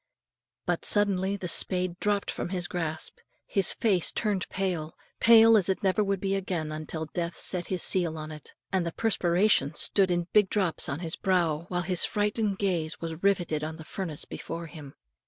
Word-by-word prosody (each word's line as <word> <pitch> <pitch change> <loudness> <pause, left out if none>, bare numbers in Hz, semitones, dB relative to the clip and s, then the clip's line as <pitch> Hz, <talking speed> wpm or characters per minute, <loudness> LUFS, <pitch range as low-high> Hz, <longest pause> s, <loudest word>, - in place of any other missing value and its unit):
But - - -1
suddenly 200 -2 +2
the 190 -2 -5
spade 180 +1 0
dropped 205 -1 0
from - - -4
his 180 -2 -3
grasp, 160 -3 -5 0.3
his 195 - +2
face 195 -7 +1
turned 205 -4 -1
pale, 175 -5 -3 0.2
pale 225 -1 +7
as 200 -3 +3
it 190 - -1
never 195 +2 +2
would 200 -1 -1
be 195 +1 -1
again 180 -5 -2
until 155 +1 -4
death 170 +2 -4
set 180 -2 -1
his 185 -2 +2
seal 170 -4 +1
on 155 0 -6
it, 150 -1 -10 0.2
and 190 -2 +2
the 170 -1 -4
perspiration 180 -7 +2
stood 195 +3 +3
in 175 -1 0
big 205 -3 +4
drops 190 -6 0
on 145 - -4
his 165 -2 -3
brow, 170 -5 0
while 175 -1 -1
his 180 0 +2
frightened 210 -1 0
gaze 170 -6 -1
was 165 0 -6
riveted 175 -6 +1
on 160 +1 -5
the 160 - -11
furnace 165 -6 -4
before 170 +1 -6
him. 150 -4 -11
180 Hz, 185 wpm, -27 LUFS, 165-195 Hz, 0.3 s, pale